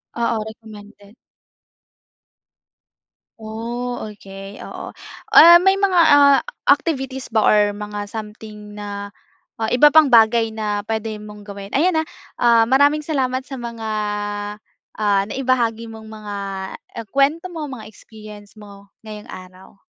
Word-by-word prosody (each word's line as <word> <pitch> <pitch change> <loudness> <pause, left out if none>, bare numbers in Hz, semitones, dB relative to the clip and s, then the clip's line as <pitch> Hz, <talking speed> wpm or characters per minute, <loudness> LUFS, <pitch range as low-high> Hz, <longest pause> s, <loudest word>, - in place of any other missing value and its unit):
Oo, 230 -2 -1
recommended. 210 -2 -13 2.3
Oh, 235 +3 -5
okay. 195 -1 -11
Oo. - - -8 0.4
Ah, 345 +1 +9
may 385 +1 +3
mga, 390 -2 +1
ah, 285 -1 +6 0.3
activities 265 -4 0
ba 220 -2 +1
or 210 - +5
mga 205 0 -6
something 210 -1 -9
na, 205 -1 -7 0.5
ah, 220 - 0
iba 290 +5 +5
pang 315 -3 +6
bagay 225 -1 +4
na 210 -2 -3
pwede 220 -1 -3
mong 210 -1 -12
gawin? 200 -1 -9
Ayan 325 +1 +2
ah. 320 - -8 0.3
Ah, 235 -1 +5
maraming 285 +5 +3
salamat 260 -4 -1
sa 270 -3 -8
mga, 230 -2 -6 1.1
ah, 205 -2 +2
naibahagi 240 -4 -1
mong 220 -1 -11
mga 215 -1 -8 0.6
e - - -3
kuwento 285 +5 +2
mo, 310 -3 -5
mga 245 -5 -9
experience 215 -1 -14
mo, 200 -1 -14 0.2
ngayong 210 -1 -10
araw. 185 +1 -13
220 Hz, 125 wpm, -20 LUFS, 210-260 Hz, 2.3 s, Ah